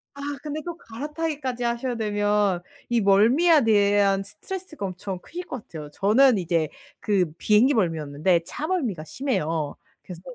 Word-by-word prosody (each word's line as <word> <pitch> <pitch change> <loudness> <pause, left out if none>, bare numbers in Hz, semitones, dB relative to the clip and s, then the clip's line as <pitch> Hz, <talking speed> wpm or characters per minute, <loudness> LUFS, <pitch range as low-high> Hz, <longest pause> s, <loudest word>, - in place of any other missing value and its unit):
아 280 - -9 0.2
근데 305 0 -4
또 345 - -4
갈아타기까지 285 -1 -4
하셔야 240 +1 -1
되면 205 -3 +1 0.3
이 240 -1 +2
멀미에 245 - +5
대한 200 -2 +3
스트레스가 315 - -7
엄청 185 0 -5
크실 355 - -8
것 255 -9 -7
같아요. 150 -3 -8
저는 225 - +4
이제 165 -3 0 0.3
그 185 -6 +1
비행기 225 +7 +4
멀미는 165 -8 0
없는데 155 +5 +1
차멀미가 290 - -2
심해요. 160 - -2 0.3
그래서 175 -2 -10
210 Hz, 335 characters per minute, -24 LUFS, 185-275 Hz, 0.3 s, 멀미에